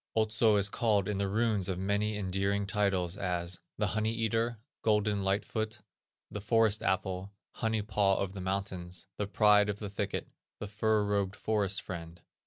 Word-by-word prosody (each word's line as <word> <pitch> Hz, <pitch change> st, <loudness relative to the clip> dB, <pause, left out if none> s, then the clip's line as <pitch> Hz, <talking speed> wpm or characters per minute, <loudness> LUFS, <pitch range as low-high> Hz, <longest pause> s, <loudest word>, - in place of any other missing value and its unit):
Otso 110 Hz, 0 st, +3 dB
is 100 Hz, -1 st, +3 dB
called 105 Hz, -3 st, +1 dB
in 105 Hz, -2 st, -1 dB
the 100 Hz, -, +1 dB
runes 105 Hz, -2 st, +1 dB
by 95 Hz, -, 0 dB
many 100 Hz, +3 st, 0 dB
endearing 100 Hz, +1 st, 0 dB
titles 100 Hz, -3 st, 0 dB
as 90 Hz, -2 st, -2 dB, 0.2 s
"The 105 Hz, -, +1 dB
Honey 110 Hz, +1 st, +1 dB
Eater," 115 Hz, 0 st, 0 dB, 0.2 s
"Golden 105 Hz, -2 st, +2 dB
Light 95 Hz, +2 st, +1 dB
Foot," 110 Hz, 0 st, -3 dB, 0.5 s
"The 105 Hz, -, -5 dB
Forest 110 Hz, 0 st, +3 dB
Apple," 95 Hz, +1 st, -1 dB, 0.2 s
"Honey 110 Hz, -2 st, -1 dB
Paw 100 Hz, -1 st, +2 dB
of 95 Hz, -1 st, -2 dB
the 100 Hz, -, -6 dB
Mountains," 95 Hz, -1 st, -2 dB
"The 105 Hz, -, -2 dB
Pride 105 Hz, 0 st, +5 dB
of 105 Hz, -, -2 dB
the 105 Hz, -2 st, -6 dB
Thicket," 100 Hz, -, -3 dB, 0.3 s
"The -, -, -5 dB
Fur 105 Hz, +1 st, +1 dB
robed 100 Hz, -1 st, 0 dB
Forest 105 Hz, -2 st, 0 dB
Friend." 85 Hz, -2 st, -7 dB
100 Hz, 170 wpm, -31 LUFS, 95-110 Hz, 0.5 s, Pride